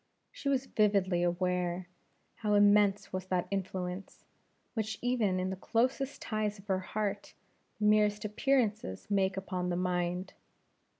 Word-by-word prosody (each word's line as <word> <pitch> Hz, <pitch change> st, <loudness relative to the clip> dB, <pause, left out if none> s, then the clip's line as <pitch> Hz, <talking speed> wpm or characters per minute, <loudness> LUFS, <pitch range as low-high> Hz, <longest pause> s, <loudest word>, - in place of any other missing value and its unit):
She 280 Hz, -, -3 dB
was 270 Hz, -1 st, +1 dB
vividly 200 Hz, -6 st, +2 dB
aware 180 Hz, 0 st, 0 dB, 0.5 s
how 210 Hz, -2 st, +1 dB
immense 205 Hz, -1 st, +4 dB
was 185 Hz, 0 st, -3 dB
that 185 Hz, -2 st, 0 dB
influence, 185 Hz, -1 st, -4 dB, 0.5 s
which, 220 Hz, -2 st, -2 dB
even 225 Hz, -7 st, +1 dB
in 185 Hz, +1 st, -1 dB
the -, -, -2 dB
closest 255 Hz, +7 st, 0 dB
ties 215 Hz, -2 st, -1 dB
of 195 Hz, -, -15 dB
the 190 Hz, -2 st, +1 dB
heart, 205 Hz, +2 st, -3 dB, 0.4 s
the 210 Hz, -, +1 dB
merest 210 Hz, 0 st, +3 dB
appearances 215 Hz, -, 0 dB
make 195 Hz, -1 st, +2 dB
upon 185 Hz, -2 st, -2 dB
the 175 Hz, -, 0 dB
mind. 180 Hz, 0 st, -1 dB
200 Hz, 135 wpm, -31 LUFS, 185-215 Hz, 0.5 s, immense